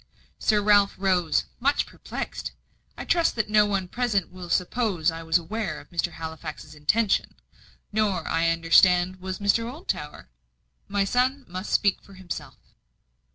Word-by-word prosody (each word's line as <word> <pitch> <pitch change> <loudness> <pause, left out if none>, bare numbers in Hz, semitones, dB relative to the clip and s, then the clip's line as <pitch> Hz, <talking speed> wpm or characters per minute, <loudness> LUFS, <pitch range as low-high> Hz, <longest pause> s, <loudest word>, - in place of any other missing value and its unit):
Sir 210 -1 +2
Ralph 205 -1 +4
rose, 185 -4 +2 0.2
much 280 +4 +2
perplexed. - - -6 0.4
"I - - -6
trust 340 -1 +2
that 215 -2 -1
no 210 -1 +5
one 195 -3 -1
present 215 -4 -1
will 180 -1 -9
suppose 180 -2 +1
I 165 0 -7
was 165 +1 +3
aware 210 +6 -4
of - - -16
Mr. 170 -1 -1
Halifax's 160 -2 -7
intention. 195 +8 +1 0.6
Nor, 205 -6 0
I 165 +1 +2
understand, 175 +2 +4
was 185 0 -5
Mr. 230 +3 +1
Oldtower. 265 - -5 0.6
My 200 0 +1
son 255 +5 +1
must 185 +2 -6
speak 200 -2 +2
for 195 - -16
himself." 185 -2 -7
190 Hz, 145 wpm, -25 LUFS, 170-215 Hz, 0.6 s, no